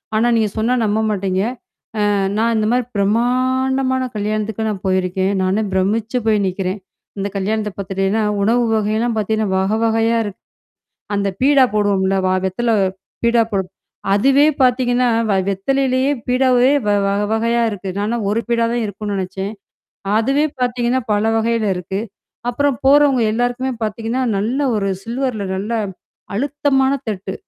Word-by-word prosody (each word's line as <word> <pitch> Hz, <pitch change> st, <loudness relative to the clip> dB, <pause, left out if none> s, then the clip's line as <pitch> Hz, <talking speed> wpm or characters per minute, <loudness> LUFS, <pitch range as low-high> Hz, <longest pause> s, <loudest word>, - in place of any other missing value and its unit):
ஆனா 225 Hz, +2 st, +3 dB
நீங்க 220 Hz, -2 st, +2 dB
சொன்னா 225 Hz, +3 st, +1 dB
நம்ப 210 Hz, +1 st, +1 dB
மாட்டீங்க. 190 Hz, -2 st, -1 dB, 0.7 s
அ -, -, +2 dB, 0.3 s
நான் 230 Hz, +1 st, +2 dB
இந்த 215 Hz, -, +1 dB
மாரி 245 Hz, -1 st, +1 dB
பிரமாண்டமான 255 Hz, +5 st, +1 dB
கல்யாணத்துக்கு 215 Hz, +1 st, -2 dB
நான் 200 Hz, -1 st, -6 dB
போயிருக்கேன். 185 Hz, +1 st, 0 dB
நானே 190 Hz, +4 st, +1 dB
பிரமிச்சு 215 Hz, +5 st, 0 dB
போய் 215 Hz, -2 st, +3 dB
நிக்கிறேன். 185 Hz, +1 st, -3 dB, 0.4 s
இந்த 195 Hz, +1 st, -1 dB
கல்யாணத்த 210 Hz, +2 st, -1 dB
பார்த்துட்டீங்கன்னா, 195 Hz, +2 st, -1 dB, 0.2 s
உணவு 240 Hz, +4 st, +2 dB
வகையல்லாம் 220 Hz, +2 st, 0 dB
பார்த்தீங்கன்னா 215 Hz, 0 st, 0 dB
வக 200 Hz, +4 st, +1 dB
வகையா 225 Hz, +1 st, +2 dB
இருக்கு. 205 Hz, -2 st, -7 dB, 0.7 s
அந்த 200 Hz, 0 st, 0 dB
பீடா 275 Hz, -1 st, +5 dB
போடுவோம்ல 195 Hz, -2 st, +1 dB
வா 185 Hz, -, +2 dB
வெத்தல 230 Hz, +6 st, -1 dB, 0.5 s
பீடா 235 Hz, 0 st, +4 dB
போடு. 190 Hz, -2 st, 0 dB, 0.5 s
அதுவே 275 Hz, +7 st, +4 dB, 0.2 s
பார்த்தீங்கன்னா, 250 Hz, 0 st, +2 dB, 0.2 s
வ 200 Hz, -, +3 dB
வெத்தலையிலேயே 260 Hz, +6 st, +1 dB, 0.2 s
பீடாவே 255 Hz, 0 st, +3 dB, 0.2 s
வ 205 Hz, -, +2 dB, 0.2 s
வ -, -, +1 dB, 0.2 s
வகையா 230 Hz, +1 st, +1 dB
இருக்கு. 195 Hz, -2 st, -5 dB
நானா 215 Hz, +3 st, -1 dB
ஒரு 220 Hz, +3 st, +1 dB
பீடா 235 Hz, -1 st, +2 dB
தான் 240 Hz, 0 st, 0 dB
இருக்கும்னு 205 Hz, 0 st, -5 dB
நெனச்சேன். 190 Hz, +2 st, -4 dB, 0.7 s
அதுவே 270 Hz, +6 st, +2 dB, 0.2 s
பார்த்தீங்கன்னா 245 Hz, 0 st, 0 dB
பல 205 Hz, +1 st, +1 dB
வகையில 230 Hz, 0 st, 0 dB
இருக்கு. 180 Hz, +2 st, -4 dB, 0.5 s
அப்புறம் 280 Hz, +1 st, 0 dB
போறவங்க 280 Hz, -2 st, +5 dB
எல்லாருக்குமே 245 Hz, +3 st, -1 dB
பார்த்தீங்கன்னா, 225 Hz, +4 st, -2 dB, 0.2 s
நல்ல 235 Hz, +8 st, -1 dB, 0.2 s
ஒரு 200 Hz, -2 st, 0 dB, 0.2 s
சில்வர்ல 240 Hz, -2 st, -2 dB
நல்லா 210 Hz, +5 st, -2 dB, 0.6 s
அழுத்தமான 270 Hz, +1 st, +1 dB, 0.2 s
தட்டு. 195 Hz, -2 st, -4 dB
220 Hz, 140 wpm, -18 LUFS, 200-250 Hz, 0.7 s, பீடா